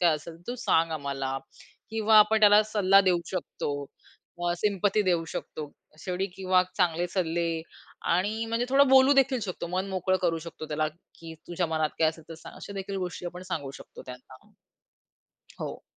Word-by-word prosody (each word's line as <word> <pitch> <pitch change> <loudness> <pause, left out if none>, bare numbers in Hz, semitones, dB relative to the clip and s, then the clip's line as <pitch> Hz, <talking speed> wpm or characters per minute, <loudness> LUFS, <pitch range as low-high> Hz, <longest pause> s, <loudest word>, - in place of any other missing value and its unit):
काय 170 -3 +4
असेल, 160 +2 -8
तर 165 - -22
तू 245 - -3
सांग 165 0 +3
आम्हाला 140 -3 -3 0.5
किंवा 220 -1 +4
आपण 215 +1 +5
त्याला 210 0 +7
सल्ला 200 -2 +4
देऊ 185 -3 +2
शकतो, 180 -5 -3 0.7
अ, 175 - +2
सिंपथी 205 +1 +1
देऊ 175 -3 +1
शकतो, 150 -2 -6 0.3
शेवटी 185 +4 -2
किंवा 185 -1 +3
चांगले 175 -2 +1
सल्ले 170 -2 -1 0.7
आणि 210 +6 0
म्हणजे 230 +2 -1
थोडं 275 +1 +5
बोलूदेखील 265 -1 +5
शकतो. 185 -3 -4
मन 185 +3 -2
मोकळं 185 0 0
करू 165 -2 +1
शकतो 155 -1 -8
त्याला, 155 0 0 0.3
की 165 -1 -10
"तुझ्या 175 0 -1
मनात 155 -1 0
काय 160 - +4
असेल 160 0 -7
तर 165 - -7
सांग." 160 - -12
अशादेखील 195 0 -6
गोष्टी 180 -1 -4
आपण 180 +1 -7
सांगू 140 -6 -3
शकतो - - -12
त्यांना. 130 +10 -13 1.1
हो. - - -5
180 Hz, 165 wpm, -27 LUFS, 165-205 Hz, 1.1 s, त्याला